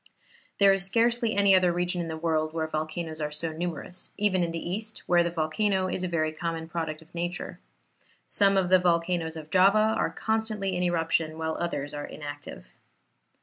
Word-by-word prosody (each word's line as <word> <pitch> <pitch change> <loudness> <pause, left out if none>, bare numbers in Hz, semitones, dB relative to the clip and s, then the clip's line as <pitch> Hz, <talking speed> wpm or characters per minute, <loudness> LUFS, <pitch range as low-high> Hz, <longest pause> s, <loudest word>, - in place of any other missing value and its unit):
There 200 -1 +7
is 195 0 +1
scarcely 230 +2 +2
any 200 -1 +5
other 185 -2 +5
region 175 +1 0
in 170 - -4
the 160 -1 -4
world 160 -1 0
where 160 -1 0
volcanoes 155 +1 -4
are 150 0 -2
so 160 +2 -1
numerous, 175 +2 -5
even 200 -3 +2
in 170 - -1
the 165 - -4
East, 215 +3 -4
where 175 -1 +4
the 170 - 0
volcano 185 +4 0
is 185 - -2
a - - 0
very 155 -3 0
common 165 0 -4
product 160 -1 -4
of 160 - -28
nature. 175 +1 -4 0.7
Some 200 -1 +3
of 185 -1 +1
the 185 - +7
volcanoes 170 -2 0
of 155 -1 -9
Java 205 +4 +5
are - - +1
constantly 220 -4 -1
in 180 - -1
eruption, 165 -2 0
while 160 0 -2
others 145 -4 -3
are 145 0 -4
inactive. 145 -1 -8
175 Hz, 190 wpm, -27 LUFS, 160-190 Hz, 0.7 s, There